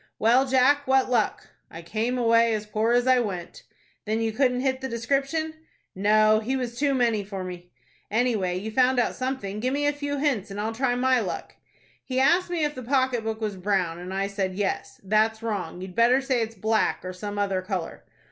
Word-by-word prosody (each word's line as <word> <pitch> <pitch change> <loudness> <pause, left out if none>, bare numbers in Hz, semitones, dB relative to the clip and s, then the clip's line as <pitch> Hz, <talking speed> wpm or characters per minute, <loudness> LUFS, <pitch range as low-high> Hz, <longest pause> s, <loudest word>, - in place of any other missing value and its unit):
"Well, 245 +5 +4
Jack, 265 +2 +3
what 265 -1 +3
luck?" 230 -4 0 0.2
"I 165 +1 -10
came 225 +8 -2
away 230 -1 +3
as 210 0 -4
poor 220 +2 0
as 245 0 +3
I 255 -1 +5
went." 185 -7 -4 0.4
"Then 220 +1 -1
you 225 -1 0
couldn't 250 +1 +1
hit 260 0 -1
the 265 - -4
description?" 275 +7 -1 0.4
"No, 215 +2 +4
he 240 +5 -2
was 245 -2 -3
too 280 +1 +1
many 230 -5 +1
for 195 -1 -6
me." 180 -1 -8 0.4
"Anyway, 215 -6 0
you 215 +4 -5
found 255 +2 +3
out 245 - +1
something. 255 -6 -4
Give 255 +4 -1
me 290 0 0
a 290 - +2
few 285 0 -3
hints, 270 -9 0
and 200 +1 -6
I'll 220 +2 -2
try 245 +1 0
my 255 0 +3
luck." 195 -6 -5 0.5
"He 260 -1 -2
asked 345 +7 +3
me 345 -3 -1
if 295 0 0
the 255 - -7
pocket 260 -2 +1
book 220 0 -4
was 210 -2 -2
brown, 180 -3 -1
and 180 +1 -7
I 195 +1 -1
said 195 -2 -3
yes. 200 0 -3
That's 220 +3 +1
wrong. 190 -6 -3
You'd 185 -1 -7
better 235 +5 +4
say 265 -3 0
it's 225 0 -3
black, 220 -3 0
or 185 - -5
some 205 +2 -6
other 195 -2 0
color." 185 -3 -5
225 Hz, 210 wpm, -25 LUFS, 205-260 Hz, 0.5 s, I